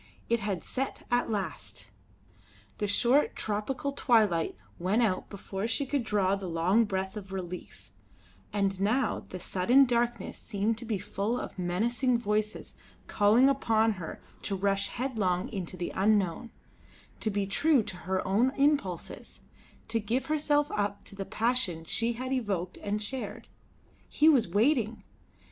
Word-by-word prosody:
It 235 0 +3
had 200 -4 -2
set 270 +1 -4
at 245 -1 +2
last! 120 - -4 0.9
The 210 - 0
short 245 +7 +3
tropical 220 +7 -2
twilight 220 - +2 0.2
went 195 +7 +2
out 190 -5 0
before 195 +1 -4
she 255 +5 0
could 275 -1 -1
draw 200 -3 +2
the 195 -2 -6
long 180 +7 +3
breath 190 -1 -3
of 200 -2 -8
relief; 180 -2 -7 0.6
and 195 -2 0
now 220 +4 +1
the 185 - -5
sudden 215 +10 +4
darkness 240 -3 -1
seemed 215 +1 -1
to 240 - -7
be 220 -3 -1
full 205 +6 -2
of - - -7
menacing 235 +8 +1
voices 215 -1 -2 0.3
calling 220 +5 +4
upon 225 -5 +3
her 180 -6 -6 0.2
to 200 - -2
rush 195 +1 +1
headlong 210 -8 -1
into 185 -4 -5
the 175 - -3
unknown; 200 +1 +1 0.7
to 220 - -1
be 200 -1 0
true 275 +6 +3
to 190 - -7
her 185 +3 -2
own 230 +8 +3
impulses, 275 - -1 0.5
to 225 0 +1
give 235 +5 -1
herself 295 0 +1
up 205 -1 -1
to - - -12
the 195 0 -4
passion 215 -9 0
she 230 +7 0
had 255 +3 -3
evoked 195 -8 -2
and 210 +1 -2
shared. 255 +4 -5 0.6
He 305 - +3
was 270 - +5
waiting! 225 - +1
210 Hz, 150 wpm, -29 LUFS, 190-240 Hz, 0.9 s, was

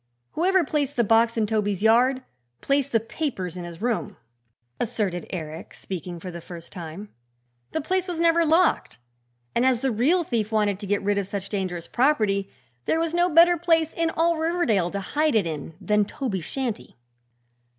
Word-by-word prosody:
"Whoever 375 +2 +2
placed 290 -2 -1
the 235 - +3
box 225 +2 +3
in 220 - +2
Toby's 205 -2 -1
yard 250 +4 +4 0.4
placed 280 0 0
the 225 - +3
papers 225 - -4
in 180 -1 -6
his 170 +4 -9
room," 225 -4 -1 0.6
asserted 200 -6 -2
Eric, 160 -2 -7
speaking 175 -2 -6
for 180 +2 -7
the 170 0 -8
first 170 0 -10
time. 175 +4 -8 0.6
"The 315 - -1
place 375 +4 -1
was 345 -2 -4
never 335 0 +4
locked, 330 +3 +2 0.6
and 235 - +2
as 255 -2 +2
the 270 -1 +1
real 290 +11 +2
thief 225 -7 -2
wanted 210 -3 +1
to 205 - -6
get 200 0 0
rid 205 0 +1
of 195 - -3
such 200 -1 -5
dangerous 185 -4 -3
property 215 -8 +1 0.4
there 320 - +1
was 330 0 -1
no 350 +1 +3
better 340 +2 +6
place 325 -1 +2
in 330 -1 0
all 330 +1 +1
Riverdale 315 - +1
to 200 - -3
hide 300 +7 0
it 210 -5 +3
in 160 0 -5
than 210 +1 +2
Toby's 200 - -4
shanty." 255 -5 -4
225 Hz, 180 wpm, -25 LUFS, 195-310 Hz, 0.6 s, better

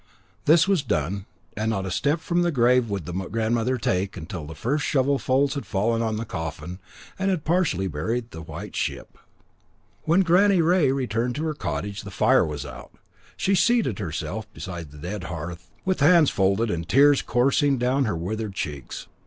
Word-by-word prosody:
This 165 +3 +5
was 195 -5 +3
done, 95 - -2 0.3
and 110 +2 -1
not 95 -4 -1
a 95 - -4
step 145 - +1
from 175 +1 0
the 175 - +2
grave 125 -3 +3
would 100 -5 -3
the 90 - -6 0.2
grandmother 115 +3 0
take 95 -3 -1
till 85 -8 -6
the 80 - -8
first 140 - -1
shovelfuls 135 0 +1
had 140 - -5
fallen 115 +3 0
on 110 -2 -1
the 115 - -3
coffin 80 0 -6 0.4
and 190 +1 +1
had 180 -6 -1
partially 160 - +1
buried 110 +10 -3
the 80 - -8
white 80 -1 -8
ship. - - -3 0.9
When 170 +4 +4
Granny 190 +2 +4
Rea 165 -4 +3
returned 125 -2 -1
to 150 - -3
her 160 -1 -1
cottage, 100 - -4
the - - -9
fire - - +3
was - - -5
out. - - -10 0.4
She 195 - +1
seated 205 - +2
herself 90 +4 -4
beside 85 -4 -7
the 75 - -14
dead 90 +6 -5
hearth, 85 +2 -7 0.2
with 185 -2 0
hands 160 +1 +5
folded 100 +3 +1
and 85 -1 -2
the - - -14
tears 140 +5 +5
coursing 135 +3 +2
down 130 +3 +1
her 105 -7 -1
withered 105 +4 -4
cheeks. 70 -7 -5
115 Hz, 185 wpm, -24 LUFS, 90-145 Hz, 0.9 s, This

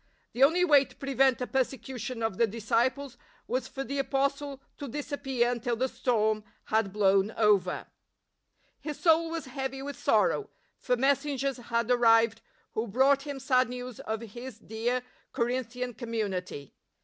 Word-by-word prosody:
The 250 - -4
only 345 +6 +5
way 290 -5 +6
to - - -16
prevent 270 -2 +2
a - - 0
persecution 255 -2 -3
of 225 -4 -1
the 230 - +5
disciples 235 +5 -1 0.3
was 255 +1 -2
for 270 - -5
the 275 +2 -3
Apostle 275 0 -1 0.2
to 285 - -5
disappear 270 -3 -1
until 240 0 -1
the 255 +3 0
storm 220 -4 0 0.2
had 215 -2 +1
blown 195 0 +3
over. 210 -3 +2 0.9
His 300 -2 -6
soul 330 -1 +4
was 330 -2 -4
heavy 265 0 -4
with 285 0 -5
sorrow, 420 - +2 0.3
for 250 -1 0
mes 275 +2 +3
sengers 275 -3 -3
had 235 0 0
arrived 230 -2 +4 0.3
who 220 +2 -2
brought 270 +6 +3
him 285 -1 -4
sad 255 -1 +2
news 250 -1 -7
of 220 0 -4
his 240 +2 -8
dear 235 +3 -2 0.3
Corinthian 250 +1 -2
community. 200 - -4
250 Hz, 150 wpm, -29 LUFS, 225-275 Hz, 0.9 s, way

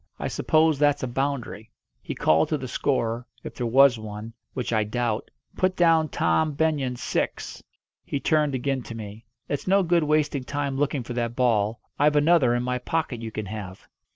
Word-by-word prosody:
I - - -3
suppose 155 -2 +2
that's 145 -1 +2
a - - 0
boundary." 120 -5 -3 0.3
He - - -6
called 80 +1 +3
to 155 - +1
the 130 -2 -6
scorer 120 -2 -1 0.2
if - - -7
there 120 - -3
was 130 0 +5
one, 110 +1 -7 0.2
which 125 -2 -2
I 110 -1 +3
doubt 115 +1 -2 0.3
"Put 185 0 +1
down 165 -3 +4
Tom 130 - +1
Benyon 140 -4 0
six!" - - -3 0.4
He 140 - -3
turned 150 0 +1
again 135 +1 -1
to 115 - -8
me. 110 0 -9 0.2
"It's 145 - -3
no 195 +1 +4
good 170 -1 +2
wasting 150 -2 +1
time 140 0 -3
looking 140 -1 0
for 120 - -6
that 120 -1 -2
ball. 115 -3 +1 0.2
I've 150 +1 +4
another 145 -5 +4
in 120 - -1
my 125 0 -1
pocket 130 -3 -2
you 115 - -5
can 110 -1 -4
have." 100 -2 -8
130 Hz, 185 wpm, -25 LUFS, 115-150 Hz, 0.4 s, was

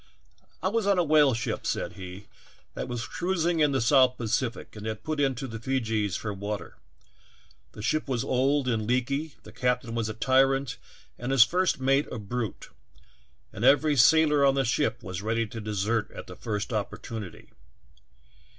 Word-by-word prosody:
"I - - +2
was 220 0 0
on 200 -2 +3
a 180 - +4
whale 150 -5 +4
ship," 120 -1 -3
said - - -2
he, 95 +1 -9 0.5
"that - - -5
was 120 -2 -4
cruising 175 -1 -1
in 150 -2 +4
the 135 - +1
South 130 +1 +4
Pacific 115 +1 -2
and 105 +1 -7
had 110 -1 -5
put 155 -1 -3
into 135 -2 0
the 115 -3 -6
Feejees 110 -6 -1
for 105 -2 -4
water. 100 -1 -5 1.0
The 105 - -9
ship 155 +6 0
was 125 -3 -1
old 135 +1 +1
and 110 -3 0
leaky, 140 +5 -1
the - - -12
captain 125 -2 -1
was 115 -2 -1
a 110 - -5
tyrant 135 +2 +2 0.4
and 125 +2 -3
his 135 -3 +8
first 180 +4 +1
mate 135 +2 +2
a - - -4
brute, 110 +1 -5 0.8
and 105 - -6
every 145 +3 +5
sailor 150 +2 +5
on 135 -1 +4
the 135 -1 +1
ship 125 +1 0
was 95 0 -5
ready 115 +2 0
to 115 +1 -7
desert 105 +1 -1
at - - -9
the - - -10
first 105 +1 -4
opportunity. 105 -1 -5
125 Hz, 175 wpm, -27 LUFS, 110-140 Hz, 1.0 s, his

